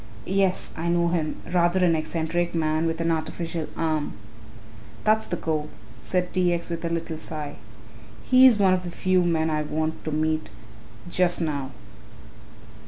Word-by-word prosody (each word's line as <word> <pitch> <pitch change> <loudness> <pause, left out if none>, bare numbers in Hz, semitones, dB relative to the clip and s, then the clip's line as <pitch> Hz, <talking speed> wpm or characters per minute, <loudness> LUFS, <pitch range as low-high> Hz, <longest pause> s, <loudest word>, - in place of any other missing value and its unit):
Yes, 190 -1 +1
I 165 +1 -2
know 170 0 +2
him, 165 -3 -1 0.2
rather 180 +1 +3
an 165 -2 +4
eccentric 165 +2 -1
man 155 0 +1
with 165 0 -2
an 165 0 +1
artificial 165 0 -3
arm." 155 -2 -1 0.9
"That's 220 0 +2
the 175 - -2
cove," 155 -2 -2 0.3
said 180 +7 -1
T. 180 -2 +3
X. 170 0 -3
with 170 0 -4
a 170 - -1
little 165 -1 -3
sigh; 150 -3 -6 0.7
"he's 255 -3 +7
one 195 -2 +4
of 185 - +1
the 180 - -6
few 185 +1 +2
men 160 -2 +1
I 155 0 0
want 155 +1 -2
to 155 - -2
meet 155 +1 0 0.6
just 175 0 +1
now." 145 -5 -2
165 Hz, 160 wpm, -25 LUFS, 155-180 Hz, 0.9 s, he's